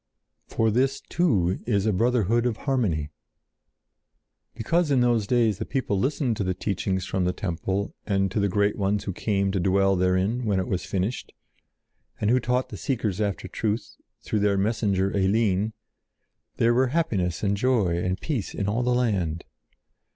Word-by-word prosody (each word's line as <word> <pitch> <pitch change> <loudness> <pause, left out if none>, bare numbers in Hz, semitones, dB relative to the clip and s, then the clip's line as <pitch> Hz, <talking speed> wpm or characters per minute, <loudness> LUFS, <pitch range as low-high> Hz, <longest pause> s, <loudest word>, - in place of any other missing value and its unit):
For 115 -1 +1
this 135 +4 +1
too 100 - +1
is 100 -4 +1
a 110 - +2
brotherhood 115 +2 +2
of 115 -3 -2
harmony." 95 - 0 1.4
Because 165 +8 +1
in 135 -3 +3
those 120 -4 +2
days 115 -4 +2
the - - -1
people 115 -7 -1
listened 130 -2 0
to - - -1
the 95 -1 -1
teachings 95 -1 -2
from 95 -1 -1
the 90 - +1
temple 95 +2 -3
and 95 -2 +1
to 105 - -1
the 100 0 +1
great 100 +2 +1
ones 100 +1 0
who 95 - -4
came 100 0 0
to 95 - -1
dwell 95 +2 +3
therein 95 +6 +1
when 100 -4 +1
it 95 - -2
was 90 - -2
finished, 100 +6 -3 0.9
and 105 +1 +1
who 130 - +4
taught 125 +2 0
the - - -7
seekers 110 -7 -2
after 100 -2 -2
truth, 110 +3 -3 0.3
through 110 - -1
their 100 -1 +2
messenger 100 -2 0
Eline, 100 +1 +2 0.9
there 115 +1 +3
were 130 +2 +3
happiness 110 - -1
and 100 0 +2
joy 105 -6 +1
and 90 +1 -2
peace 130 -11 -3
in 100 - -2
all 110 +4 0
the 125 0 +1
land. 95 -10 0
105 Hz, 170 wpm, -25 LUFS, 95-120 Hz, 1.4 s, who